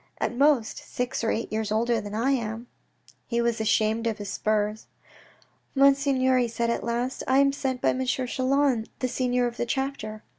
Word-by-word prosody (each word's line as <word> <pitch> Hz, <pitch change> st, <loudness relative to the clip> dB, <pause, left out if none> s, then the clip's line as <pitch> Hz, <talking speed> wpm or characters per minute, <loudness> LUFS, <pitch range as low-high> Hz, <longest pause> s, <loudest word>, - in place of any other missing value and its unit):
" -, -, -43 dB
At -, -, -1 dB
most 275 Hz, -4 st, +2 dB
six 245 Hz, -1 st, -4 dB
or 225 Hz, -, +1 dB
eight 225 Hz, -, -2 dB
years 215 Hz, -1 st, -2 dB
older 230 Hz, +1 st, +1 dB
than 205 Hz, 0 st, -6 dB
I 240 Hz, +5 st, +1 dB
am! 230 Hz, -3 st, -2 dB, 0.3 s
" -, -, -26 dB, 0.2 s
He 235 Hz, -1 st, -1 dB
was 235 Hz, -1 st, 0 dB
ashamed 220 Hz, +1 st, +1 dB
of 220 Hz, -2 st, -1 dB
his 205 Hz, -2 st, -6 dB
spurs.' 215 Hz, 0 st, -1 dB, 0.5 s
" -, -, -35 dB
Monseigneur," 275 Hz, -2 st, +4 dB
he 245 Hz, -, +2 dB
said 235 Hz, 0 st, -1 dB
at -, -, -2 dB
last, 240 Hz, +2 st, -2 dB
" -, -, -27 dB
I 260 Hz, -, +3 dB
am 275 Hz, 0 st, +5 dB
sent 265 Hz, -2 st, -3 dB
by -, -, +3 dB
M. 260 Hz, -, 0 dB
Chelan, 260 Hz, -1 st, +1 dB
the 255 Hz, -, -1 dB
senior 250 Hz, 0 st, 0 dB
of 240 Hz, 0 st, -4 dB
the -, -, -1 dB
chapter." 235 Hz, -5 st, -3 dB
240 Hz, 210 wpm, -26 LUFS, 220-260 Hz, 0.5 s, am